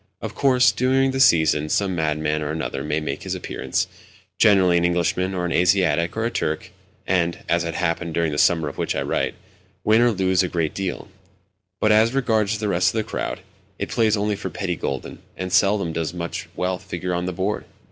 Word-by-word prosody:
Of - - -6
course, 130 -2 +4
during 135 +1 +2
the 135 - -3
season, 80 - +4
some 95 +1 +1
madman 75 -2 -1
or 75 - -3
another 70 -3 -3
may 75 +1 -1
make 75 -3 -4
his - - -3
appearance—generally 95 -5 0
an 85 - +2
Englishman, 90 +2 0
or 90 -1 -1
an 90 - -2
Asiatic, 85 -1 +2
or 115 - 0
a 115 - -1
Turk—and 85 +2 -3
(as 85 0 +2
had 85 0 -4
happened 85 -2 -1
during 85 -2 +1
the 75 - -2
summer 80 -3 +3
of 70 - -7
which - - -1
I - - -1
write) - - -1 0.5
win 110 +2 +4
or 120 - +5
lose 95 -2 +2
a 90 - 0
great 85 -3 -1
deal; 95 -2 -4 0.7
but, 110 - +3
as 110 +4 +4
regards 110 -5 +1
the 105 0 -2
rest 90 -2 +2
of - - 0
the 110 - +1
crowd, - - -4 0.4
it - - -4
plays 110 -2 +2
only 105 0 0
for 100 - -5
petty 90 -3 -3
gülden, 70 -5 -5 0.2
and 90 0 -4
seldom 100 -3 +3
does 80 +1 -3
much 85 -1 -5
wealth 90 0 -2
figure 90 +1 -4
on 90 +1 -2
the - - -1
board. 95 +4 -2
90 Hz, 200 wpm, -22 LUFS, 85-105 Hz, 0.7 s, or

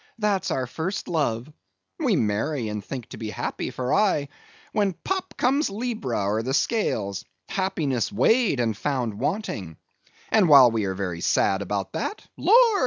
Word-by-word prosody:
that's 210 -4 0
our 130 - -1
first 160 +10 -4
love; 135 -8 0 0.5
we - - +2
marry 110 +4 0
and 105 -1 -4
think 125 +2 -6
to - - -10
be 110 - -5
happy - - -3
for 130 0 -2
aye, 195 -9 +2 0.4
when 205 -3 +1
pop 380 - -4
comes 275 +2 +2
Libra, 200 - -2
or 105 +3 +1
the 130 +4 -1
Scales—happiness 130 - -1
weighed 200 - +3
and 115 -3 +1
found 125 -1 -1
wanting; 100 - -3 0.5
and 205 -6 +4
while 135 -5 +9
we 110 -2 0
are 95 -1 -2
very 90 -3 -3
sad 95 0 +2
about 100 0 -3
that, 160 - -4
Lord! 460 -3 +5
130 Hz, 155 wpm, -25 LUFS, -, 0.5 s, while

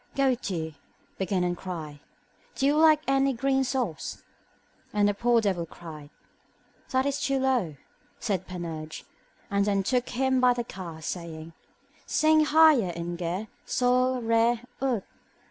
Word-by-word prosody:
Go 275 -1 +3
to, 170 -9 -4 0.5
begin 190 -1 0
and 175 0 0
cry, 160 -6 -7 0.6
Do 270 - 0
you 285 +2 +4
lack 310 -1 +5
any 270 0 +3
green 270 +2 +1
sauce? 250 - -3 0.7
and 205 -1 +3
the 205 - +2
poor 235 +3 +3
devil 185 -5 -1
cried. 155 -4 -10 0.8
That 260 0 +1
is 280 0 -1
too 275 0 +1
low, 255 - +1 0.4
said 195 -5 -2
Panurge; 165 -4 -6 0.5
then 200 0 +2
took 250 +4 0
him 260 +1 +1
by 250 -1 +5
the 240 -1 -3
ear, 165 -4 -7
saying, 165 -1 -6 0.5
Sing 310 0 +4
higher 305 - +5
in 170 +1 -4
Ge, 175 +5 -3 0.2
sol, 255 0 +1
re, 230 +1 +3 0.2
ut. 255 -7 0
225 Hz, 140 wpm, -27 LUFS, 175-265 Hz, 0.8 s, lack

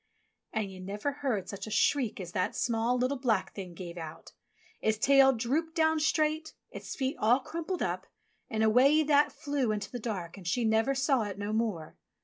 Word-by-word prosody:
And 215 -3 -2
you 185 - -10
never 205 +8 -3
heard 265 -9 -2
such 200 +1 -6
a - - -5
shriek 245 +1 +1
as 175 -2 -6
that 185 +1 -1
small, 235 0 +1
little, 255 +2 0
black 215 -7 0
Thing 185 -4 -7
gave 175 -1 -7
out. 160 -1 -9 0.5
Its 220 0 +1
tail 270 +3 +6
dropped 280 +8 -1
down 320 -1 +3
straight, 310 0 0 0.2
its - - -7
feet 270 +3 -2
all 235 +4 +4
crumpled 335 +6 -4
up, - - -3 0.4
and 220 -1 0
away 265 +8 +5
That 295 0 +4
flew 285 -4 -1
into 210 -1 -3
the 245 - -5
dark 195 -6 -5
and 185 -3 -9
she 235 +6 +1
never 225 +5 +2
saw 265 -1 +2
it 205 -3 -4
no 205 +1 -3
more. 215 -9 -2
235 Hz, 190 wpm, -30 LUFS, 205-280 Hz, 0.5 s, tail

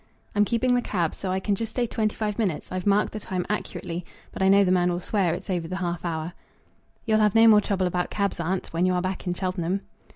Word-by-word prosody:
"I'm 205 0 +3
keeping 235 +3 +1
the 245 - +3
cab, 175 -8 -1
so 190 - -5
I 185 +1 0
can 200 +2 0
just 225 +2 -2
stay 240 +2 -1
twenty 220 -2 -1
five 210 -1 -2
minutes. 190 -9 -1
I've 185 +1 -3
marked 200 +1 +3
the 215 - -4
time 185 -3 -3
accurately, 180 -4 -3 0.3
but - - -7
I 190 - +4
know 200 +1 +6
the 185 - +2
man 180 -1 +3
will 175 - -1
swear 185 -2 +1
it's - - -9
over 175 -4 -2
the 185 - -4
half 175 -2 -3
hour." 165 0 -3 0.7
"You'll 220 -2 +3
have 210 -1 +3
no 225 0 +7
more 210 -2 +7
trouble 195 -2 0
about 180 0 -1
cabs, 200 -2 -1
aunt, 180 +2 -2
when 175 +2 +2
you 185 - +2
are 180 - +1
back 185 0 -3
in 175 - 0
Cheltenham." 185 0 -1
190 Hz, 255 wpm, -25 LUFS, 180-210 Hz, 0.7 s, no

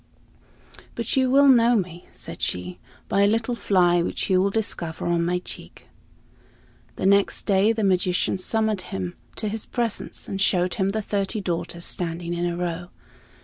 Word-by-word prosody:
"But - - -2
you 260 -1 +3
will 280 +2 +6
know 240 -2 +6
me," 180 -4 -3
said - - -9
she, 90 0 -3 0.3
"by 200 - +2
a 200 - +5
little 225 +3 +1
fly 180 -6 +3
which 175 - -2
you 185 0 +4
will 200 - +2
discover 195 -6 -2
on 170 -1 +1
my 175 +1 +1
cheek." 180 - -8 1.1
The - - -3
next 200 +1 +3
day 200 +1 +3
the 225 -1 -1
magician 185 -1 +1
summoned 220 0 0
him 95 - -5 0.2
to 215 - -3
his 215 +1 -4
presence, 235 -3 -3
and 195 -1 -3
showed 180 -2 +2
him 190 -2 0
the 215 +2 -2
thirty 200 +1 -1
daughters 170 -2 -3
standing 170 0 -2
in 175 0 -1
a 170 0 -3
row. 175 0 -3
190 Hz, 170 wpm, -24 LUFS, 175-215 Hz, 1.1 s, will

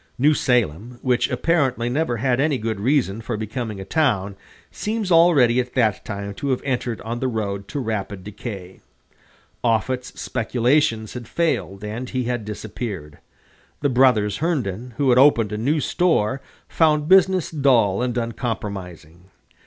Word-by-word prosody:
New 145 +4 +4
Salem, 120 - 0
which 125 -2 +1
apparently 135 -8 +1
never 125 -1 0
had 125 +2 +1
any 145 -1 +2
good 110 -3 -3
reason 115 -3 +1
for 115 0 -4
becoming 110 -1 -4
a 95 - -7
town, 105 -8 0 0.4
seems 215 -3 -3
already 150 -8 +5
at 125 0 -3
that 110 -6 +1
time 100 -1 -5
to 140 +7 -4
have 130 - 0
entered 125 -4 -2
on 115 +2 -4
the 130 - -1
road 100 -4 -3
to 145 - -4
rapid 105 -5 -4
decay. 100 -3 -8 0.8
Offutt's 125 +2 -1
speculations 115 -1 0
had 120 -2 -7
failed, 130 - -1
and 115 +4 -5
he 130 -1 -2
had 120 -2 -3
disappeared. 105 -7 -6 0.6
The 145 - +2
brothers 120 -6 +3
Herndon, 125 - -2
who 140 -2 +2
had 125 - +5
opened 120 -7 +5
a 105 - -3
new 145 +7 +1
store, 135 - +1 0.3
found 150 -2 +2
business 190 -1 +4
dull 125 - +3
and 125 -1 -1
unpromising. 100 - -5
120 Hz, 150 wpm, -22 LUFS, 105-135 Hz, 0.8 s, already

